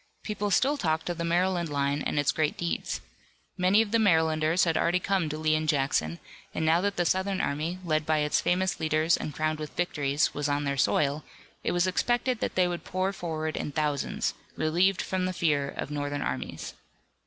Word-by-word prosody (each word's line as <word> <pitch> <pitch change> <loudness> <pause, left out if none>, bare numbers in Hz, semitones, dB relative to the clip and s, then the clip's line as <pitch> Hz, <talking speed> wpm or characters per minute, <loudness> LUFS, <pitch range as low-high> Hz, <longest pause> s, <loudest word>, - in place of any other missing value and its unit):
People 210 -1 -2
still 270 +9 +3
talked 160 - -1
of 170 - -6
the - - -1
Maryland 175 0 +1
line 140 0 0
and 150 - -1
its 145 - +3
great 155 -1 0
deeds. 170 -1 -2 0.5
Many 190 +4 +4
of 210 - -8
the 230 - +3
Marylanders 160 -3 +3
had 165 -2 +1
already 175 +3 +2
come 185 -4 0
to 155 - -4
Lee 155 0 +1
and 155 0 0
Jackson, 135 - +1 0.4
and 160 - 0
now 165 +2 +4
that 200 +1 0
the 175 - 0
Southern 190 +2 +1
army, 155 +5 -1
led 155 -2 +1
by 155 0 +1
its 150 0 +1
famous 185 +1 0
leaders 155 +1 +2
and - - -4
crowned 155 0 -1
with 155 -1 -7
victories, 145 -5 0
was 145 0 -2
on 145 0 0
their 140 -1 -1
soil, 145 +2 +1 0.4
it - - 0
was 175 0 +2
expected 240 +6 +1
that - - -2
they 185 -1 +3
would 175 -1 -4
pour 185 +1 -1
forward 160 -4 -3
in - - -3
thousands, 150 -2 -1 0.2
relieved 175 +5 +2
from 185 -1 -1
the 185 - -1
fear 145 -5 +1
of 140 - -5
Northern 145 -1 -2
armies. - - -4
160 Hz, 200 wpm, -28 LUFS, 150-185 Hz, 0.5 s, Many